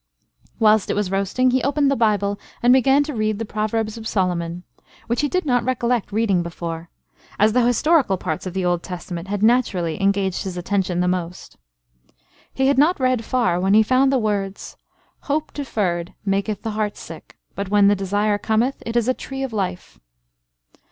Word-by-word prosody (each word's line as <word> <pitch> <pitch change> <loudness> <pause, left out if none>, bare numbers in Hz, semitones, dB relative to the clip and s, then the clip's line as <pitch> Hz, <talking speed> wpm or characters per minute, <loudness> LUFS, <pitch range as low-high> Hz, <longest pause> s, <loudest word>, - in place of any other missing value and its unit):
Whilst 215 -2 +3
it - - 0
was 205 -3 -1
roasting, 200 +7 +1
he 260 +1 +2
opened 280 0 +1
the - - +2
Bible, 205 -3 +1 0.2
and 245 +1 +6
began 270 +2 +4
to 295 0 -5
read 215 -2 -1
the 225 - -4
Proverbs 215 +1 -2
of 220 - -6
Solomon, 175 -3 -1 0.4
which 235 +3 -1
he 290 - 0
did 365 +2 -1
not 245 -4 +2
recollect 245 -3 -1
reading 205 -4 +1
before, 170 -1 -6 0.5
as 210 +1 +3
the 250 0 +3
historical 245 - +3
parts 180 +1 -4
of 185 - -7
the 190 -1 -1
Old 175 -1 +1
Testament 180 -1 -7
had 205 +1 -2
naturally 210 -7 +1
engaged 195 -1 +1
his 185 -2 -5
attention 180 -1 -1
the 180 - +1
most. 180 -1 -4 1.0
He 265 - 0
had 275 0 +3
not 315 +3 +3
read 255 -3 +1
far, 230 -8 +1
when 190 +2 +2
he 220 - +6
found 260 +4 +3
the 270 - +3
words, 200 -4 -3 0.5
"Hope 305 +2 -1
deferred 190 - -2
maketh 195 +1 -1
the 225 - -2
heart 210 -1 -2
sick; 160 -1 -11 0.2
but 200 -1 -5
when 205 -1 +4
the 205 - +4
desire 205 +2 0
cometh, 230 +6 0
it 230 - -4
is 235 -1 +2
a 255 - +3
tree 270 +1 -6
of 265 -4 -4
life." 185 -4 -4
210 Hz, 185 wpm, -21 LUFS, 190-245 Hz, 1.0 s, and